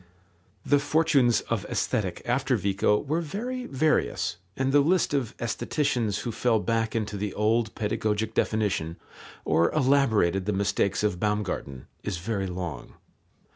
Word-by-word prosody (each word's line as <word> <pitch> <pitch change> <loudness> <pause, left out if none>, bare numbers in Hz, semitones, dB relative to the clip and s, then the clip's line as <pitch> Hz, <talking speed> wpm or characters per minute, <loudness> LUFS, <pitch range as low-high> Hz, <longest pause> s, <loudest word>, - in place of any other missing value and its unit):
The 145 - +4
fortunes 145 -5 +3
of - - -2
Aesthetic - - -2
after - - +1
Vico 100 +1 +2
were 155 +8 -1
very 245 - -4
various, 130 - 0 0.2
and 130 0 +1
the 145 - +5
list 165 +2 +2
of 130 -5 -1
aestheticians 120 -3 -1
who 120 - -3
fell 115 0 +1
back 115 +1 -1
into 105 -2 -2
the 100 -1 -3
old 110 +1 +1
pedagogic 110 0 -1
definition, 100 -9 0 0.5
or 85 +1 +3
elaborated 120 - +2
the 105 - +1
mistakes 100 0 0
of 105 -4 0
Baumgarten, 100 -11 -2 0.2
is 100 -4 -3
very 100 +2 -2
long. 90 -5 -6
110 Hz, 135 wpm, -27 LUFS, 100-135 Hz, 0.5 s, the